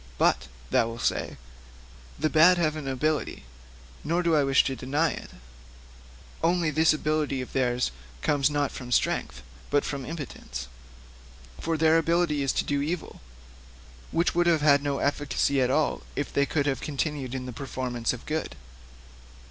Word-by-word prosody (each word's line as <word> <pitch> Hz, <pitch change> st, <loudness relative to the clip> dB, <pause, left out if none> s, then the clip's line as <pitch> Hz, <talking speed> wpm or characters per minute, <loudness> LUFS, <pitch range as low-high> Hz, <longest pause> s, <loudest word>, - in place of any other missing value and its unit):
"But," 65 Hz, -, +2 dB, 0.2 s
thou 115 Hz, -, +3 dB
wilt 115 Hz, 0 st, -6 dB
say, -, -, -1 dB, 0.8 s
"the 155 Hz, -, +1 dB
bad 165 Hz, +4 st, +6 dB
have 155 Hz, -3 st, +1 dB
an 150 Hz, -3 st, -5 dB
ability." 150 Hz, +3 st, -1 dB, 0.6 s
Nor 170 Hz, +3 st, 0 dB
do 170 Hz, -2 st, +3 dB
I 150 Hz, -, +4 dB
wish 135 Hz, -1 st, +4 dB
to 135 Hz, -, -2 dB
deny 145 Hz, +5 st, 0 dB
it; -, -, -8 dB, 1.1 s
only 170 Hz, -1 st, +2 dB
this 160 Hz, +2 st, +4 dB
ability 155 Hz, -2 st, 0 dB
of 125 Hz, -, -6 dB
theirs 125 Hz, -, +1 dB, 0.3 s
comes 145 Hz, -1 st, +2 dB
not 145 Hz, -1 st, 0 dB
from 125 Hz, -2 st, -8 dB
strength, 65 Hz, -, 0 dB, 0.3 s
but 145 Hz, 0 st, +2 dB
from 140 Hz, -2 st, -3 dB
impotence. 140 Hz, -, -6 dB, 0.9 s
For 165 Hz, 0 st, -1 dB
their 160 Hz, +1 st, +5 dB
ability 165 Hz, -2 st, +1 dB
is 135 Hz, -1 st, +1 dB
to -, -, +1 dB
do 145 Hz, -1 st, 0 dB
evil, 160 Hz, +4 st, -4 dB, 0.9 s
which 170 Hz, +1 st, +1 dB
would 175 Hz, 0 st, +2 dB
have 165 Hz, -3 st, +3 dB
had 140 Hz, -1 st, +5 dB
no 140 Hz, -1 st, -1 dB
efficacy 140 Hz, -1 st, +1 dB
at 125 Hz, -, +2 dB
all 150 Hz, +3 st, +1 dB
if 145 Hz, -, -3 dB
they 140 Hz, 0 st, +2 dB
could 145 Hz, -3 st, 0 dB
have 135 Hz, -2 st, -1 dB
continued 140 Hz, -3 st, -3 dB
in 130 Hz, -1 st, -4 dB
the 125 Hz, -, -6 dB
performance 125 Hz, -2 st, -2 dB
of 125 Hz, -, -7 dB
good. 155 Hz, +1 st, -3 dB
145 Hz, 165 wpm, -27 LUFS, 135-155 Hz, 1.1 s, bad